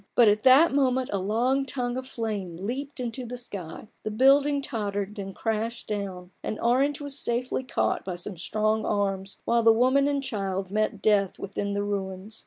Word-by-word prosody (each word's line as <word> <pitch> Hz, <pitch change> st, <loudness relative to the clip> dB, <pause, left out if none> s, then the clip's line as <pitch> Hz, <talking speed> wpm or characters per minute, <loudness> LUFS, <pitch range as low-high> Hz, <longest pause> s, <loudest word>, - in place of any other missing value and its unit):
But 235 Hz, -, +6 dB
at 210 Hz, +1 st, +4 dB
that 265 Hz, +4 st, +6 dB
moment 260 Hz, -2 st, +1 dB
a 200 Hz, -, +1 dB
long 240 Hz, +8 st, +1 dB
tongue 250 Hz, -2 st, -3 dB
of 260 Hz, 0 st, -5 dB
flame 210 Hz, -8 st, -4 dB
leaped 260 Hz, +10 st, -5 dB
into 250 Hz, +1 st, -4 dB
the 245 Hz, +1 st, -6 dB
sky, 200 Hz, -6 st, -8 dB
the -, -, -3 dB
building 275 Hz, +5 st, +4 dB
tottered 205 Hz, -6 st, -3 dB
and 210 Hz, -, -13 dB
then 195 Hz, -2 st, -6 dB
crashed 225 Hz, +1 st, -2 dB
down, 195 Hz, -4 st, -4 dB
and 215 Hz, -, -4 dB
Orange 270 Hz, +4 st, +2 dB
was 285 Hz, -1 st, -1 dB
safely 245 Hz, +2 st, -1 dB
caught 255 Hz, -, 0 dB
by 185 Hz, -2 st, -4 dB
some 180 Hz, +3 st, -6 dB
strong 215 Hz, +5 st, 0 dB
arms, 195 Hz, -2 st, -2 dB
while 235 Hz, 0 st, +3 dB
the 225 Hz, 0 st, +6 dB
woman 260 Hz, +5 st, +4 dB
and 285 Hz, -1 st, 0 dB
child 195 Hz, -6 st, -3 dB
met 215 Hz, -1 st, -1 dB
death 200 Hz, -3 st, +3 dB
within 200 Hz, +1 st, -3 dB
the 200 Hz, 0 st, -1 dB
ruins. 200 Hz, +1 st, -4 dB
220 Hz, 190 wpm, -27 LUFS, 200-255 Hz, -, But